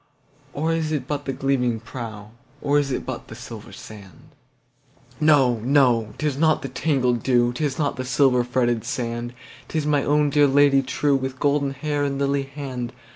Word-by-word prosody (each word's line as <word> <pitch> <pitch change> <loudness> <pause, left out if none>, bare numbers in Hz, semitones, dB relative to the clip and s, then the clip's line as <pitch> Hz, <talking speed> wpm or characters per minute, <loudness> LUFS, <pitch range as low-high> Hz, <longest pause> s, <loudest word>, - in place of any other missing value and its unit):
Or 160 +3 0
is 160 -1 -1
it 140 -5 -2
but 145 -1 -3
the 135 - -1
gleaming 125 -3 0
prow, 110 -3 -8 0.3
Or 145 0 +2
is 140 -1 -1
it - - -3
but 130 -2 -6
the 110 - -10
silver 115 -3 -10
sand? 100 -6 -13 0.9
No! 140 -6 +4
no! 120 -3 +2
'tis 150 -3 -2
not 160 -1 +3
the 135 - -4
tangled 130 -3 0
dew,'Tis 125 +3 +1
not 145 -3 -1
the 130 - -3
silver 125 0 +3
fretted 120 -2 0
sand, 120 -1 -4 0.3
It - - -9
is 155 -2 0
my 145 -2 +2
own 150 0 +2
dear 145 -1 +5
Lady 140 0 +4
trueWith 135 0 -1
golden 140 0 +1
hair 145 +1 -2
and 140 -1 -1
lily 140 0 +1
hand! 130 -4 -6
135 Hz, 175 wpm, -23 LUFS, 120-145 Hz, 0.9 s, dear